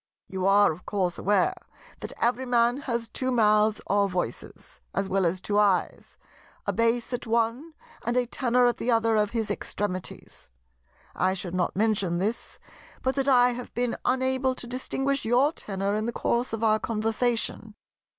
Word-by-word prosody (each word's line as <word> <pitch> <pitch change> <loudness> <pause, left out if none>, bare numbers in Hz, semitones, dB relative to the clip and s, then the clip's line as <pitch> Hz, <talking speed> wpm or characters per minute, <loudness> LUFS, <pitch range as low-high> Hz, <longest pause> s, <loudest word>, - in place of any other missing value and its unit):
"You 190 0 -2
are 200 -1 +5
of 160 +3 -10
course 185 -4 -1
aware 205 - +2 0.5
that - - -5
every 250 +2 0
Man 240 0 +3
has 235 -1 -1
two 260 +2 -3
mouths 215 -3 +3
or 200 0 +2
voices—as 185 +1 -5
well 190 -2 +1
as 180 +3 -1
two 205 +2 0
eyes—a 200 -3 -2
bass 230 +2 +1
at 245 - -4
one 235 +8 0 0.3
and 240 +2 -1
a 250 - +2
tenor 250 0 +1
at 240 -1 +2
the 245 - -3
other 225 -1 +3
of 210 -1 +2
his 220 -2 -2
extremities. 205 -2 -5 0.6
I 185 +1 +1
should 180 -2 -5
not 180 -1 -1
mention 200 -4 +1
this, 210 +6 -3 0.5
but 260 - +1
that 275 0 -1
I 250 -2 +5
have 245 0 -7
been 245 0 0
unable 260 +1 +1
to 250 - -7
distinguish 270 +3 -2
your 250 +7 +3
tenor 195 - -3
in 215 +2 -1
the - - -1
course 240 +2 0
of 225 0 -3
our 215 -1 +3
conversation." 225 0 -1
225 Hz, 165 wpm, -26 LUFS, 205-245 Hz, 0.6 s, are